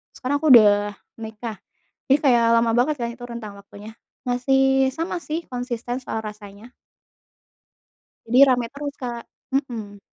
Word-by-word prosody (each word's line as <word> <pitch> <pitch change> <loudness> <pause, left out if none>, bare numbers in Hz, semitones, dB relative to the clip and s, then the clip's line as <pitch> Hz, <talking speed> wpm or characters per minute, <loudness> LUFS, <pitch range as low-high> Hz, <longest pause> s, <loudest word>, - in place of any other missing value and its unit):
sekarang 280 +3 -2
aku 315 - +2
udah 205 -3 +6 0.3
nikah, 220 -1 -7 0.5
jadi 275 - +5
kayak 245 -4 +4
lama 230 0 +2
banget 295 +5 +2
kan 235 - -1
itu 240 +1 -12
rentang 230 -4 -8
waktunya, 205 +2 -13 0.3
masih 265 +1 +2
sama 335 +2 -3
sih 330 +1 -4
konsisten 245 -1 -4
soal 250 -3 -5
rasanya. 210 +2 -10 1.5
Jadi 240 +2 +1
rame 245 -2 +1
terus 285 0 -6
Kak. 240 -2 -5 0.3
Mhm. 225 -7 -4
240 Hz, 135 wpm, -22 LUFS, 220-265 Hz, 1.5 s, udah